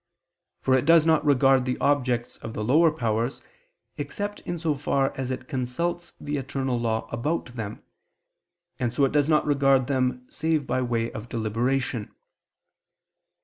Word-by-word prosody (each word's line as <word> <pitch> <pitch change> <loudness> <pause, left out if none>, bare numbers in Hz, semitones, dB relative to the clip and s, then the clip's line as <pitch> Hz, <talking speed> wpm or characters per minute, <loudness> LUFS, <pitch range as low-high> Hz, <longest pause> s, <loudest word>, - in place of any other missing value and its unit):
For 130 - +3
it 130 +1 +3
does 165 -1 +6
not 160 -2 +3
regard 135 -2 +4
the 125 -1 -1
objects 125 -4 0
of 110 - -8
the 105 - -2
lower 155 +9 +5
powers, 120 -3 -1 0.6
except 205 0 -4
in 175 - -5
so 160 -2 0
far 135 -1 0
as 130 -1 -3
it 130 0 -4
consults 155 +6 -3
the 145 0 -3
eternal 135 -2 -2
law 115 -1 -1
about 125 +1 -2
them, 110 -3 -6 1.0
and 120 -2 0
so 135 +3 +2
it 135 - 0
does 145 0 +2
not 155 -1 +3
regard 135 -2 +3
them 130 -2 0
save 155 -2 -1
by 130 +1 0
way 115 -2 -1
of 110 +2 -8
deliberation. 115 +1 -1
130 Hz, 155 wpm, -26 LUFS, 120-145 Hz, 1.0 s, does